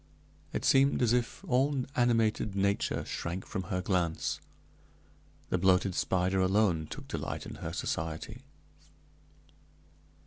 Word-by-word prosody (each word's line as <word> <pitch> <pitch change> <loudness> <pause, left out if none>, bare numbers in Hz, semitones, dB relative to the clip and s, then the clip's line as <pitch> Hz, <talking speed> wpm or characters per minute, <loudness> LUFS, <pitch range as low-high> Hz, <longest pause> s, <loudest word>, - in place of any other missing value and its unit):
It - - -3
seemed 135 -1 +4
as 120 -1 +3
if 120 -1 -1
all 135 +1 +2
animated 115 -4 +2
nature 100 +1 0
shrank 85 +3 -4
from 95 - -4
her 90 -1 -2
glance. 90 -4 0 1.1
The 90 - +1
bloated 95 +1 +3
spider 95 +1 +1
alone 95 -4 +2
took - - -8
delight - - -4
in - - -8
her - - -4
society. 80 +9 -4
95 Hz, 115 wpm, -31 LUFS, 90-120 Hz, 1.1 s, seemed